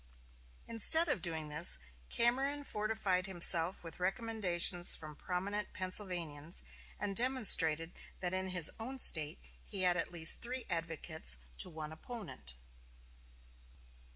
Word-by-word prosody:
Instead 320 +9 +4
of 210 - -4
doing 160 -3 -6
this, 150 +3 +5 0.3
Cameron 270 +5 0
fortified 210 -6 -4
himself 175 -1 +5
with 165 0 -12
recommendations 185 -4 +1
from 155 -1 -12
prominent 195 +6 -7
Pennsylvanians, 180 -5 -4 0.4
and 205 -1 -6
demonstrated 185 -10 +4 0.3
that 180 0 -5
in 185 0 -4
his 180 -4 +2
own 255 +4 -8
State 155 - +1 0.3
he 190 - -4
had 180 -1 +2
at 170 - -5
least 165 -2 +5
three 250 +1 -7
advocates 165 - -4 0.2
to - - -4
one 155 -2 -10
opponent. 160 - -11
180 Hz, 120 wpm, -32 LUFS, 165-215 Hz, 0.4 s, this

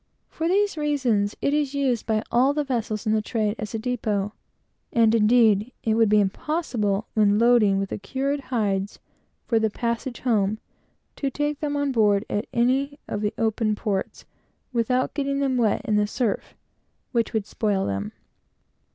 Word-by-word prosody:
For 320 - -3
these 400 0 +1
reasons, 255 -9 0
it 280 - +2
is 290 -2 0
used 260 -5 0
by 215 -1 +1
all 260 +4 +3
the 300 - +1
vessels 230 -5 -2
in 215 - +2
the 215 - +2
trade, 215 -1 -1
as 215 +1 -5
a - - 0
depot; 215 -4 -2 0.6
and, 225 -1 +4
indeed, 220 0 +4
it 220 - +1
would 225 -1 +3
be 210 0 +5
impossible, 210 - -1
when 205 -1 +3
loading 230 -4 +4
with 195 0 -2
the - - -4
cured 270 +8 -2
hides 205 -7 -2 0.5
for 230 -3 +2
the 220 0 +1
passage 235 +2 -3
home, 215 -4 +1 0.6
to 275 - -1
take 295 +2 -2
them 290 -1 -2
on 285 -1 0
board 210 -3 +3
at 205 - -1
any 265 +4 +1
of 205 - -3
the 210 -1 -1
open 220 -1 0
ports, 205 -3 -3 0.5
without 250 +2 +1
getting 275 -1 -1
them 270 -2 +1
wet 225 -4 +2
in 210 -2 +1
the 210 0 +2
surf, 230 -1 -2 0.6
which 235 -2 0
would 220 -3 -1
spoil 205 -2 -1
them. 100 +1 -3
225 Hz, 170 wpm, -24 LUFS, 210-265 Hz, 0.6 s, be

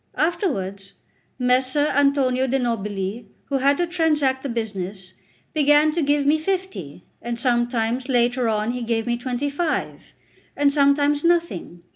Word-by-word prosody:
Afterwards, 200 - -2 0.4
Messer 255 +3 +2
Antonio 275 -2 +2
de' 265 +2 +1
Nobili, 210 -3 -3 0.2
who 275 -1 0
had 280 +2 +3
to 350 - +1
transact 305 -6 +1
the 275 - -4
business, 195 -5 -5 0.4
began 295 0 +4
to 335 +2 -1
give 290 -1 +1
me 300 +2 +3
fifty, 355 - -4 0.2
and 235 0 -4
sometimes 240 0 0
later 245 -1 +2
on 215 +1 0
he 250 0 -4
gave 230 -1 -1
me 240 - 0
twenty 250 +3 -3
five, 315 +2 -3 0.4
and 285 -1 +3
sometimes 285 0 +3
nothing. 335 - 0
260 Hz, 140 wpm, -22 LUFS, 230-290 Hz, 0.4 s, began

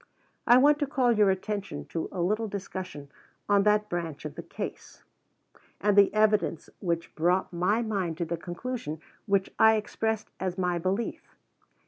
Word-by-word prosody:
I 240 0 +8
want 290 +3 +5
to 290 - 0
call 255 -3 +2
your 210 -3 +4
attention 190 - -3
to 165 - -3
a 180 - -3
little 215 +5 0
discussion 185 -7 -6 0.4
on 205 -1 +4
that 210 0 +3
branch 165 -6 -4
of 150 - -5
the - - -7
case, - - -8 0.8
and 205 0 +2
the 200 -1 +6
evidence 215 -6 +1
which 170 -2 -2
brought 180 +4 +1
my 195 +7 +1
mind 190 -7 -2
to 170 - -1
the 170 +1 -2
conclusion 175 -1 -5 0.3
which 200 -1 +1
I 220 0 +7
expressed 220 0 -2
as 185 -1 -2
my 180 -2 0
belief. 190 +6 -2
195 Hz, 160 wpm, -28 LUFS, 175-215 Hz, 0.8 s, I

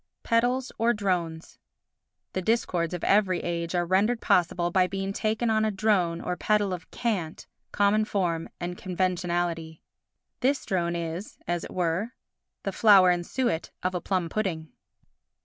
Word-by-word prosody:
Pedals 245 +3 +1
or 235 +1 +3
Drones 175 -5 -2 0.7
The 185 - -1
discords 180 -5 0
of 175 - -7
every 195 -3 +3
age 170 0 -3
are 175 0 +1
rendered 200 +7 +2
possible 175 -2 +2
by 185 0 +3
being 195 +1 -3
taken 220 +2 0
on 220 0 +2
a 220 - +2
drone 190 -5 +1
or 180 - -2
pedal 205 0 +1
of 180 -1 -7
cant, 190 -9 -3 0.3
common 205 +1 +3
form 175 -6 -1
and 175 +1 -4
conventionality. 175 -3 -2 0.6
This 275 +2 +1
drone 175 -2 0
is, 170 +3 -5
as 175 -1 -1
it - - -8
were, 180 +7 -1 0.5
the 195 - -2
flour 190 -2 +6
and 175 0 0
suet 240 -5 -1
of 185 0 0
a 180 - -2
plum 185 -3 -1
pudding. 165 -5 -2
185 Hz, 150 wpm, -27 LUFS, 175-215 Hz, 0.7 s, flour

